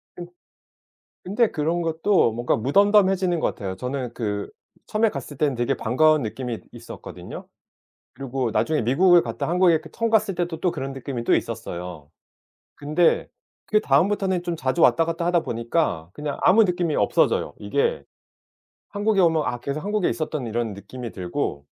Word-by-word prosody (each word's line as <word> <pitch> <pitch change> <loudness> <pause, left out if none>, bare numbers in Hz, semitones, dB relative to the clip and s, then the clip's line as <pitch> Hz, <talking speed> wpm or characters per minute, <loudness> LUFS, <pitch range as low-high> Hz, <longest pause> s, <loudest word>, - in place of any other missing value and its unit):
그 175 - -7 1.0
근데 210 +5 +1
그런 165 +3 -1
것도 165 - +2
뭔가 120 +2 0
무덤덤해지는 190 - +3
것 - - 0
같아요. 95 -2 -5
저는 125 +1 -4
그 105 -4 -3 0.4
처음에 215 +1 +2
갔을 140 -2 -7
때는 140 -3 +1
되게 120 0 0
반가운 150 +5 +3
느낌이 115 +1 -4
있었거든요. - - -10 0.7
그리고 130 -3 -3
나중에 155 +4 +1
미국을 175 +9 +5
갔다 115 0 -4
한국에 175 0 +4
이렇게 160 0 -2
처음 230 0 -1
갔을 210 -4 +2
때도 175 -2 -3
또 180 - +1
그런 135 -4 -5
느낌이 130 -2 -5
또 - - +3
있었어요. 85 -4 -5 0.6
근데 155 +4 +1 0.4
그 215 - +3
다음부터는 190 +5 +2
좀 175 -1 -2
자주 135 +3 -1
왔다 165 - +5
갔다 165 +1 -2
하다 175 -1 +2
보니까 115 - -1
그냥 150 -1 -4
아무 220 +4 +6
느낌이 175 -5 0
없어져요. - - +1
이게 470 +2 -1 0.9
한국에 205 0 0
오면 160 -3 +3
아 120 - -2
계속 140 +4 -4
한국에 205 -2 0
있었던 155 -6 -3
이런 115 -1 -2
느낌이 110 +4 -8
들고 90 -6 -4
155 Hz, 360 characters per minute, -23 LUFS, 120-180 Hz, 1.0 s, 아무